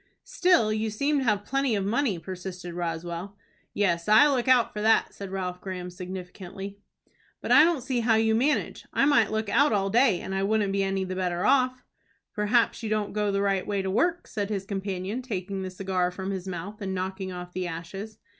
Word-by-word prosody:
"Still 350 -13 +3
you 220 +1 -1
seem 280 +7 0
to - - -1
have 205 -3 +1
plenty 275 -3 +1
of 195 -1 -1
money," 230 -1 +1
persisted 180 +1 -7
Roswell. 170 +3 -4 0.3
"Yes, 170 -5 0
I 220 +8 +8
look 260 -4 0
out 255 -2 +4
for 210 - -4
that," 220 +1 +3
said 200 -1 -7
Ralph 180 -1 -4
Graham, 180 -2 -5
significantly. 185 +2 -8 0.6
"But - - -4
I 285 +5 +9
don't 325 -6 +2
see 260 -1 -1
how 225 -1 +3
you 220 0 +3
manage. 265 +7 0
I - - +3
might 275 -7 +4
look 220 0 -2
out 285 +8 +3
all 195 -1 +1
day, 230 -5 +4
and 190 - -5
I 195 - 0
wouldn't 205 0 +1
be 200 - +1
any 195 0 0
the 185 0 -4
better 180 0 -1
off." 255 -1 +2 0.5
"Perhaps 215 +4 +2
you 220 - -3
don't 215 -1 -1
go 210 -1 0
the 200 0 0
right 195 -2 0
way 200 -2 -1
to 190 - -2
work," 345 - +1
said 205 -2 -3
his 195 -3 -3
companion, 195 +3 -3
taking 195 -5 -4
the 190 - -4
cigar 185 -1 -1
from 190 +2 -5
his 190 -1 -5
mouth, 190 +4 -6
and 190 -1 -3
knocking 190 +1 -4
off 180 0 -8
the 185 -1 -2
ashes. 190 +6 -7
200 Hz, 210 wpm, -27 LUFS, 185-225 Hz, 0.6 s, I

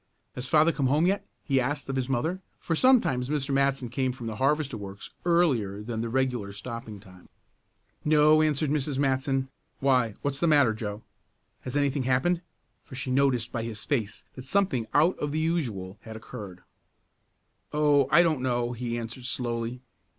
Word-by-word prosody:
"Has 125 0 -5
father 155 +3 +5
come 140 -5 0
home 150 +5 +3
yet?" 195 +2 0 0.2
he 135 -3 +2
asked 140 +2 -2
of 135 - -3
his 130 -1 -1
mother, 160 +9 -1 0.2
for 165 - -1
sometimes 155 - +3
Mr. 145 -2 -1
Matson 135 -2 +1
came 130 +2 -1
from 125 -2 -8
the 110 -2 -4
harvester 140 0 +1
works 100 -2 -8
earlier 130 - +2
than 115 0 -4
the 115 0 -2
regular 125 -5 -1
stopping 110 0 -7
time. 90 -2 -17 0.7
"No," 155 0 +5
answered 155 -1 +1
Mrs. 145 -2 -1
Matson, 135 -1 0 0.3
"why, 125 -5 +2
what 145 - 0
is 140 - -8
the 170 - +2
matter, 145 -7 +5
Joe? 105 -1 -5 0.6
Has 125 +2 -4
anything 140 -1 +1
happened?" 130 +8 +1 0.4
for 130 - -11
she 130 0 -3
noticed 130 -3 +2
by 120 - -2
his 115 -2 -5
face 115 -8 -2
that 130 - -10
something 135 - +1
out 160 +5 +3
of 150 - -2
the 155 - -2
usual 115 - -2
had 110 -1 -9
occurred. 105 -5 -9 1.1
"Oh, 145 -2 +3
I 170 +4 +6
don't 155 -6 +1
know," 120 -1 0
he 120 0 -3
answered 115 +2 -6
slowly. 120 -1 -3
130 Hz, 175 wpm, -27 LUFS, 115-150 Hz, 1.1 s, I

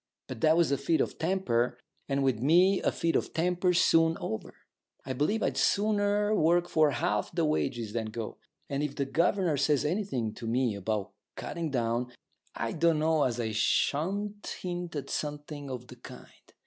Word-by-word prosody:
But 130 -4 -8
that 160 +1 +4
was 170 -4 +3
a 140 - +1
fit 160 +3 +1
of - - -1
temper, 160 -9 0 0.3
and 140 0 +1
with 130 -5 +1
me 180 - +4
a - - +1
fit 165 -1 -1
of - - -1
temper's 180 +1 +2
soon 165 0 +4
over. 110 0 -5 0.5
I 130 - -3
believe 155 - 0
I'd - - 0
sooner 205 0 +2
work 175 -2 +3
for 155 -3 +3
half 165 +5 -1
the 170 -2 0
wages 120 -8 -1
than 115 -2 -2
go. 110 0 -6 0.3
And 140 0 -2
if 150 -1 -3
the 140 - -1
governor 170 +2 +1
says 145 0 +2
anything 150 - -1
to 115 - -7
me 120 0 +1
about 100 0 -3 0.2
cutting 165 -2 -4
down, 120 -1 -1 0.4
I 115 -1 -2
don't 165 0 +2
know 155 -1 +2
as 120 -2 -1
I 110 -2 -1
shan't 195 - 0
hint 175 -2 -4
at 145 - -5
something 145 -1 -4
of 125 -2 -6
the - - -13
kind. - - -12
150 Hz, 180 wpm, -29 LUFS, 125-175 Hz, 0.5 s, that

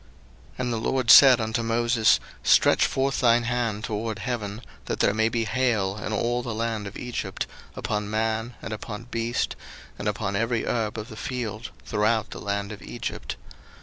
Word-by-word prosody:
02:009:022 - - -23
And 125 -1 -1
the - - -1
LORD 125 +1 +2
said 130 -3 +9
unto 110 +1 -1
Moses, 115 0 +3 0.2
Stretch - - +5
forth 135 0 0
thine 120 -1 +4
hand 115 -3 -1
toward 110 -1 -3
heaven, 110 -4 -4 0.2
that - - -3
there 100 - +3
may 110 +1 +2
be 115 0 -1
hail 110 -6 0
in - - -3
all 120 +3 0
the 120 -2 -4
land 110 -2 -2
of 100 - -8
Egypt, 120 -6 -4 0.3
upon 105 0 -2
man, 110 +2 -1
and 110 - -4
upon 105 +1 -6
beast, 115 +1 -1 0.4
and 105 - -3
upon 100 -1 -1
every 115 +2 0
herb 110 -2 -1
of 110 0 -6
the 110 - -9
field, 115 -1 -4 0.2
throughout 110 +1 +1
the - - -7
land 100 0 -2
of 105 - -8
Egypt. - - -5
115 Hz, 180 wpm, -25 LUFS, 105-120 Hz, 0.4 s, said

